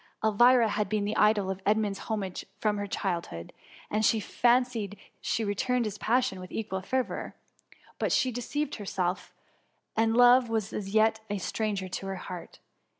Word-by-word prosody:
Elvira 235 Hz, +3 st, +5 dB
had 210 Hz, -1 st, -1 dB
been 210 Hz, -1 st, 0 dB
the 210 Hz, -, -2 dB
idol 210 Hz, -2 st, +3 dB
of 190 Hz, 0 st, -6 dB
Edmund's 205 Hz, -1 st, +1 dB
ho 220 Hz, -, +1 dB
mage 190 Hz, -3 st, -4 dB
from 210 Hz, -1 st, 0 dB
her 205 Hz, -, -3 dB
childhood; 170 Hz, -, -3 dB, 0.4 s
and 215 Hz, +1 st, +1 dB
she 220 Hz, +1 st, +4 dB
fancied 240 Hz, -2 st, +1 dB, 0.2 s
she 225 Hz, -, -1 dB
returned 235 Hz, +4 st, 0 dB
his 210 Hz, -1 st, -5 dB
passion 235 Hz, -5 st, +1 dB
with 185 Hz, 0 st, -9 dB
equal 195 Hz, -4 st, -3 dB
fervour; 255 Hz, +6 st, -2 dB, 0.6 s
but -, -, 0 dB
she 255 Hz, -, +2 dB
deceived 280 Hz, +5 st, -3 dB
herself, 190 Hz, -3 st, -2 dB, 0.6 s
and 225 Hz, +1 st, +2 dB
love 245 Hz, 0 st, +6 dB
was 220 Hz, -3 st, -1 dB
as 195 Hz, -2 st, -4 dB
yet 220 Hz, 0 st, +4 dB
a 205 Hz, -, -1 dB
stranger 200 Hz, 0 st, -2 dB
to 195 Hz, +1 st, -5 dB
her 195 Hz, -, -3 dB
heart. 180 Hz, -1 st, -8 dB
215 Hz, 165 wpm, -28 LUFS, 195-230 Hz, 0.6 s, love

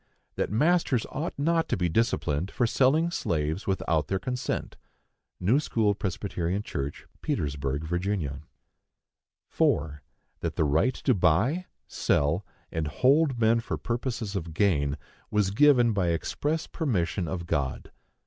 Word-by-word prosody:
That -, -, -1 dB
masters 145 Hz, -, +2 dB
ought 155 Hz, +5 st, -4 dB
not 165 Hz, +3 st, +1 dB
to -, -, +1 dB
be 90 Hz, -1 st, +1 dB
disciplined 85 Hz, -, 0 dB
for 120 Hz, -, 0 dB
selling 145 Hz, +8 st, +3 dB
slaves 80 Hz, -, -1 dB
without 85 Hz, -5 st, 0 dB
their 95 Hz, -, 0 dB
consent. 125 Hz, +6 st, -3 dB, 0.6 s
(New 110 Hz, +10 st, +3 dB
school 110 Hz, -8 st, +1 dB
Pres. 95 Hz, -2 st, -3 dB, 0.5 s
Church, 70 Hz, -7 st, -5 dB, 0.2 s
Petersburg, 70 Hz, 0 st, -2 dB
Va.) 85 Hz, -4 st, -2 dB, 1.1 s
4. 75 Hz, -1 st, 0 dB, 0.4 s
That -, -, -3 dB
the -, -, +2 dB
right 80 Hz, -, +2 dB
to 130 Hz, -, +1 dB
buy, 110 Hz, -, +2 dB, 0.2 s
sell, 75 Hz, +7 st, +1 dB, 0.3 s
and 80 Hz, -2 st, -2 dB
hold 135 Hz, -, +3 dB
men 115 Hz, +1 st, +4 dB
for 115 Hz, -, -3 dB
purposes 120 Hz, -3 st, -3 dB
of 85 Hz, -4 st, -4 dB
gain, 75 Hz, -8 st, +2 dB, 0.3 s
was 105 Hz, -3 st, +1 dB
given 120 Hz, -1 st, +5 dB
by 95 Hz, -4 st, +1 dB
express 145 Hz, -, -1 dB
permission 95 Hz, -, -1 dB
of 85 Hz, -1 st, -4 dB
God. 70 Hz, -5 st, -2 dB
100 Hz, 130 wpm, -27 LUFS, 80-125 Hz, 1.1 s, given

